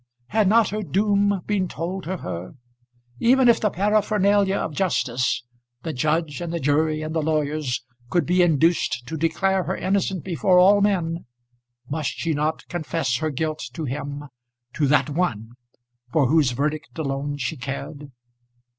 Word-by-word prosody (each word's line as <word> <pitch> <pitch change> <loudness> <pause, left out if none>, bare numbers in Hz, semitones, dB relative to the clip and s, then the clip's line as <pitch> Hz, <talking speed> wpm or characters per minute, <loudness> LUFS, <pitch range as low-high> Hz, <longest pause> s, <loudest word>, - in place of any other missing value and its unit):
Had 215 -1 +2
not 220 +1 +4
her 215 +2 -3
doom 200 +1 +1
been 200 -3 0
told 175 +4 -5
to 185 +2 -3
her? 90 - -6 0.6
Even 255 - +4
if 235 - +5
the 210 - +2
paraphernalia 200 0 +2
of 160 - -2
justice, 130 -8 0 0.4
the 160 - -3
judge, 155 +2 -1
and 170 -1 -4
the 170 - -2
jury, 155 +2 +1
and 155 0 -4
the 160 - 0
lawyers, 150 -4 -1 0.3
could 175 - +1
be 180 +1 +3
induced 165 -6 +2
to 160 - -5
declare 180 +4 +1
her 190 +5 -2
innocent 190 -2 0
before 180 +1 +2
all 200 +3 +6
men, 175 -5 0 0.6
must 150 +1 -2
she 165 -2 -1
not 155 +2 -2
confess 155 -6 -1
her 155 +4 -1
guilt 155 +2 -2
to 160 - -5
him, 145 +2 -4 0.5
to 145 - +1
that 150 +2 +3
one, 115 - -1 0.6
for 145 -1 +3
whose 145 0 +3
verdict 150 +6 -3
alone 145 -1 -2
she 125 -3 -3
cared? 140 +3 -6
160 Hz, 155 wpm, -23 LUFS, 145-190 Hz, 0.6 s, all